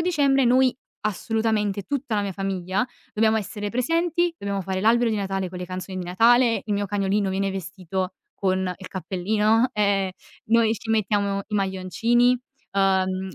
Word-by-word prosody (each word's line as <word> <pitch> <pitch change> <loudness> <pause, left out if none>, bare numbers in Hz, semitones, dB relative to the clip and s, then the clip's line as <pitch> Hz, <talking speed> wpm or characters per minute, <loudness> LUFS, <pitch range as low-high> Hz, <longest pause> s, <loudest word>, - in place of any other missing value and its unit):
dicembre 285 -6 +3
noi 255 +1 +4 0.3
assolutamente, 215 -1 -1
tutta 275 -1 -3
la 205 - +1
mia 200 -1 -3
famiglia, 195 +3 -2 0.3
dobbiamo 220 +1 +3
essere 205 0 -3
presenti, 335 +7 0
dobbiamo 200 -1 -3
fare 190 0 -2
l'albero 230 +2 +3
di 215 - 0
Natale 195 -2 -2
con 180 - -7
le 180 - -5
canzoni 185 +1 -6
di 180 - -4
Natale, 230 +5 +4
il 210 - -2
mio 205 0 -1
cagnolino 200 0 0
viene 195 +1 0
vestito 185 0 -4 0.2
con 190 -1 0
il 180 +1 -6
cappellino, 210 +6 +1
e 200 -2 +2
e - - -19 0.3
noi 225 0 +4
ci 225 +1 -6
mettiamo 200 -2 +1
i 210 - -4
maglioncini, 210 +6 +2 0.4
uhm, 190 -2 +1
200 Hz, 160 wpm, -24 LUFS, 190-230 Hz, 0.4 s, noi